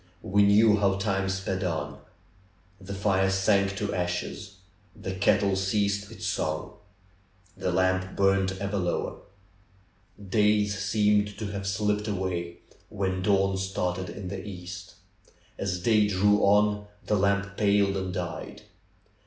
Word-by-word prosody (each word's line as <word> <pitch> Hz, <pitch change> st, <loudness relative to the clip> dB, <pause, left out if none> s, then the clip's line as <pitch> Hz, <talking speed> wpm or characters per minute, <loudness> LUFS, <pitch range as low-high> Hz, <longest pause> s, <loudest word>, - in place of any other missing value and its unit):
We 100 Hz, +2 st, +2 dB
knew 105 Hz, +2 st, +5 dB
how 100 Hz, -2 st, +2 dB
time 95 Hz, -1 st, -1 dB
sped 95 Hz, 0 st, -2 dB
on. 75 Hz, -5 st, -3 dB, 0.8 s
The 100 Hz, 0 st, -7 dB
fire 95 Hz, -1 st, +2 dB
sank 100 Hz, 0 st, +2 dB
to 105 Hz, 0 st, -2 dB
ashes. 90 Hz, +3 st, -3 dB, 0.4 s
The 95 Hz, -, -5 dB
kettle 100 Hz, +1 st, +2 dB
ceased 100 Hz, +1 st, 0 dB
its -, -, -8 dB
song. 80 Hz, +3 st, -2 dB, 0.8 s
The 90 Hz, -, -2 dB
lamp 95 Hz, +1 st, +1 dB
burned 95 Hz, -1 st, +2 dB
ever 100 Hz, +1 st, -2 dB
lower. 90 Hz, -1 st, -2 dB, 1.1 s
Days 105 Hz, 0 st, +2 dB
seemed 105 Hz, 0 st, +1 dB
to 105 Hz, -2 st, -4 dB
have 100 Hz, -1 st, -4 dB
slipped 105 Hz, +2 st, 0 dB
away 90 Hz, -4 st, -3 dB, 0.3 s
when 95 Hz, -2 st, -2 dB
dawn 95 Hz, 0 st, +2 dB
started 95 Hz, -1 st, -2 dB
in 95 Hz, -3 st, -7 dB
the 95 Hz, 0 st, -5 dB
east. 90 Hz, -1 st, -8 dB, 0.6 s
As 95 Hz, -2 st, -2 dB
day 105 Hz, +2 st, +3 dB
drew 105 Hz, +1 st, +3 dB
on 105 Hz, +1 st, +3 dB, 0.2 s
the 105 Hz, -, +1 dB
lamp 100 Hz, 0 st, +1 dB
paled 100 Hz, -1 st, +2 dB
and 95 Hz, -1 st, -3 dB
died. 90 Hz, -2 st, -5 dB
100 Hz, 130 wpm, -27 LUFS, 95-105 Hz, 1.1 s, knew